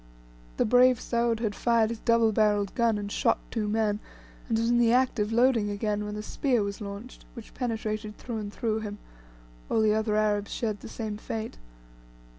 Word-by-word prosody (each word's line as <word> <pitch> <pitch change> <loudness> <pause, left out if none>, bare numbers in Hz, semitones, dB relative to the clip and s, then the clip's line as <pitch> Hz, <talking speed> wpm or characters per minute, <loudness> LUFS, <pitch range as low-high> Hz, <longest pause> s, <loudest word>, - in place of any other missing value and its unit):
The - - +2
brave 250 +1 +5
Soud 235 -1 0
had 215 -3 0
fired 230 0 +2
his 230 - -5
double 230 -1 +3
barrelled 205 -2 +2
gun 230 -3 +2
and 205 0 -5
shot - - +2
two 215 -3 -1
men, 210 -1 +1 0.5
and 225 - +2
was 230 +1 +1
in 240 0 +3
the 235 -1 +4
act 255 -1 +2
of 210 +1 0
loading 235 -2 +3
again 210 0 -2
when 210 0 -5
a 210 - -5
spear 250 -2 0
was 200 +1 -5
launched, 205 +4 -8
which 230 -3 -11
penetrated 215 -3 -3
through 235 -3 -5
and 205 -1 -5
through 220 0 -1
him: 210 -1 -6 0.7
all 220 - +2
the 215 -1 +4
other 215 0 0
Arabs 210 -1 +1
shared 215 -3 -2
the - - -10
same 215 -2 -5
fate. 220 +1 -5
220 Hz, 195 wpm, -27 LUFS, 210-235 Hz, 0.7 s, brave